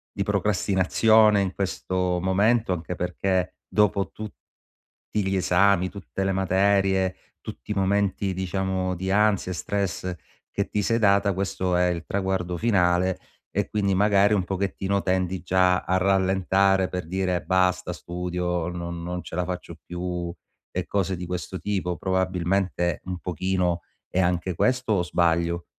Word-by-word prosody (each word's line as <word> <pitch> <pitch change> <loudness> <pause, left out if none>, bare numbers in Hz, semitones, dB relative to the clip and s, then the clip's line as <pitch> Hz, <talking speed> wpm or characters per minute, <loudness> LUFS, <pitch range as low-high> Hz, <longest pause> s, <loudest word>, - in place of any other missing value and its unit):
di 100 - -3
procrastinazione 105 +2 +3
in 95 -1 -2
questo 95 -2 -1
momento 100 +3 +2
anche 90 +1 -4
perché 90 +1 -1
dopo 100 -2 +1
tut 110 -1 -7 0.8
ti 105 -2 0
gli 95 - 0
esami, 95 0 +3
tutte 95 -1 -5
le 95 - +1
materie, 95 0 +2 0.3
tutti - - -7
i - - -2
momenti 100 0 +1
diciamo 95 0 -1
di 95 +2 -3
ansia 100 -2 +2
e - - -4
stress 95 -1 -2 0.4
che 100 - -2
ti 105 - 0
sei 115 +4 +1
data, 100 -2 +3
questo 95 -2 -1
è 90 0 +3
il 85 -2 -2
traguardo 95 -2 -1
finale 90 -4 +2 0.3
e - - -1
quindi 100 -2 0
magari 100 +1 +4
un 95 - +1
pochettino 95 +1 -1
tendi 95 -1 -1
già 90 0 +3
a 95 - 0
rallentare 95 0 +2
per 90 -3 -4
dire: 90 -1 -1
"Basta 90 -1 +1
studio, 90 0 -3
non 85 -1 -5
non 90 +1 -4
ce 80 - -9
la 90 - 0
faccio 90 0 -6
più." 90 -1 -4 0.4
E - - -3
cose 95 -2 -1
di 90 0 -6
questo 90 +1 -4
tipo. 95 -4 -2
Probabilmente 95 -2 0
un 90 -1 -4
pochino 90 0 -1 0.3
è 95 - 0
anche 90 0 0
questo, 125 +3 +1
o 90 - +2
sbaglio? 85 0 +1
95 Hz, 150 wpm, -25 LUFS, 90-100 Hz, 0.8 s, magari